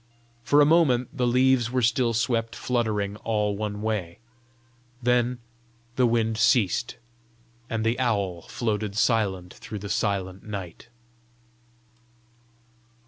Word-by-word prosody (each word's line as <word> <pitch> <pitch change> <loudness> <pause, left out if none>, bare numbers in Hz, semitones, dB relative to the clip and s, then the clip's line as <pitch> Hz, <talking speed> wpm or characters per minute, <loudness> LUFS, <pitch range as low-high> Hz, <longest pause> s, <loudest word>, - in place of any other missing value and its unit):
For 145 +6 +4
a - - +6
moment 150 -5 +3
the 125 -3 +1
leaves 125 -1 +3
were 125 0 0
still 115 0 +2
swept 115 0 0
fluttering 105 -4 -1
all 105 -2 -1
one 105 0 -4
way; 100 -6 -2 0.8
then 125 0 +1 0.6
the 125 -2 +3
wind 115 -1 0
ceased, 115 -1 +2 0.7
and 115 -1 -2
the 115 +2 +1
owl 100 -8 0
floated 105 -3 -2
silent 100 -6 +1
through 105 - -8
the 100 0 -7
silent 95 -3 -1
night. 100 -1 -7
115 Hz, 115 wpm, -25 LUFS, 105-125 Hz, 0.8 s, a